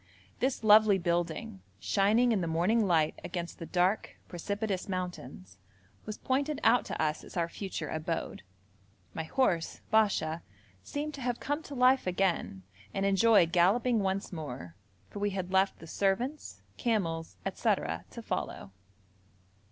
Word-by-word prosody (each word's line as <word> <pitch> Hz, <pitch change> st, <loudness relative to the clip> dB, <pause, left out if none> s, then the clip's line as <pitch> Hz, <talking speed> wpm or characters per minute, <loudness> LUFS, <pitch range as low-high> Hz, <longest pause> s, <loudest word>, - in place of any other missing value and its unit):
This 260 Hz, -2 st, 0 dB
lovely 215 Hz, -1 st, +7 dB
building, 170 Hz, -, -2 dB, 0.2 s
shining 215 Hz, -, +3 dB
in 210 Hz, -4 st, +1 dB
the 170 Hz, -, -1 dB
morning 190 Hz, +7 st, +2 dB
light 160 Hz, -4 st, +2 dB
against 175 Hz, -1 st, -5 dB
the 165 Hz, -, -6 dB
dark 185 Hz, +4 st, 0 dB
precipitous 200 Hz, +2 st, -3 dB
mountains, 135 Hz, -, -6 dB, 0.5 s
was 215 Hz, -, -5 dB
pointed 280 Hz, +3 st, -1 dB
out 240 Hz, +2 st, +4 dB
to -, -, -5 dB
us 155 Hz, -1 st, 0 dB
as -, -, -10 dB
our 170 Hz, -1 st, +1 dB
future 170 Hz, -3 st, -5 dB
abode. 160 Hz, -, -3 dB, 0.7 s
My -, -, -3 dB
horse, 175 Hz, -6 st, 0 dB
Basha, 185 Hz, -7 st, +2 dB, 0.4 s
seemed 295 Hz, -, -4 dB
to 275 Hz, -, -8 dB
have 245 Hz, -1 st, -1 dB
come 290 Hz, +2 st, -2 dB
to 290 Hz, -3 st, -9 dB
life 255 Hz, -2 st, +4 dB
again 180 Hz, -, 0 dB, 0.3 s
and 195 Hz, -, 0 dB
enjoy 200 Hz, 0 st, +5 dB
galloping 200 Hz, +8 st, +3 dB
once 195 Hz, 0 st, -2 dB
more, 125 Hz, -, -6 dB, 0.4 s
for -, -, -6 dB
we 205 Hz, 0 st, +1 dB
had 185 Hz, -1 st, -3 dB
left 190 Hz, +1 st, +3 dB
the -, -, -12 dB
servants, 205 Hz, -, -2 dB
camels, 170 Hz, -9 st, -1 dB, 0.2 s
&c. -, -, -16 dB, 0.5 s
to -, -, -8 dB
follow. 95 Hz, -, -4 dB
190 Hz, 145 wpm, -30 LUFS, 170-225 Hz, 0.7 s, lovely